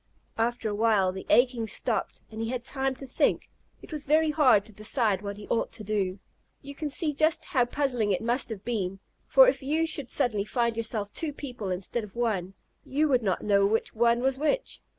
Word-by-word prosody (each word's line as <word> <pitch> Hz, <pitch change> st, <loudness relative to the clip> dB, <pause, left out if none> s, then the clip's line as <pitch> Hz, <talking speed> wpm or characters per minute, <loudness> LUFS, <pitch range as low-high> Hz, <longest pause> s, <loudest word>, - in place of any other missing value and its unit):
After 235 Hz, 0 st, 0 dB
a 210 Hz, -, -2 dB
while 205 Hz, -3 st, +2 dB
the 190 Hz, +1 st, -8 dB
aching 245 Hz, -2 st, +3 dB
stopped, -, -, -2 dB
and 220 Hz, +1 st, -6 dB
he 225 Hz, -, -2 dB
had 250 Hz, -1 st, -3 dB
time 265 Hz, 0 st, -1 dB
to 270 Hz, -, -10 dB
think. 255 Hz, -, 0 dB, 0.3 s
It -, -, -10 dB
was 300 Hz, -1 st, -3 dB
very 310 Hz, +1 st, +3 dB
hard 255 Hz, -10 st, +4 dB
to 220 Hz, -, -12 dB
decide 215 Hz, -1 st, 0 dB
what 200 Hz, -1 st, -5 dB
he 205 Hz, -, -9 dB
ought 230 Hz, -, -1 dB
to 220 Hz, -, -6 dB
do. 195 Hz, -3 st, -1 dB, 0.5 s
You 280 Hz, +1 st, -8 dB
can 300 Hz, +1 st, -4 dB
see 300 Hz, +1 st, 0 dB
just 310 Hz, +3 st, +1 dB
how 265 Hz, -10 st, +2 dB
puzzling 245 Hz, -5 st, 0 dB
it 190 Hz, -, -1 dB
must 240 Hz, +3 st, 0 dB
have 210 Hz, -3 st, -7 dB
been, 195 Hz, -5 st, -2 dB, 0.3 s
for, -, -, +7 dB
if -, -, +1 dB
you 310 Hz, +4 st, 0 dB
should 290 Hz, -5 st, -1 dB
suddenly 215 Hz, -6 st, +1 dB
find 235 Hz, +1 st, -1 dB
yourself 220 Hz, -2 st, -1 dB
two 320 Hz, -3 st, -2 dB
people 245 Hz, -8 st, -6 dB
instead 185 Hz, +6 st, -3 dB
of 205 Hz, -2 st, -11 dB
one, 195 Hz, -6 st, -1 dB, 0.3 s
you 295 Hz, +4 st, +1 dB
would 255 Hz, -3 st, +3 dB
not 195 Hz, -5 st, -1 dB
know 200 Hz, -1 st, +3 dB
which 220 Hz, +2 st, -1 dB
one 235 Hz, +1 st, +2 dB
was 265 Hz, +1 st, 0 dB
which. 405 Hz, +12 st, -1 dB
235 Hz, 210 wpm, -27 LUFS, 210-275 Hz, 0.5 s, for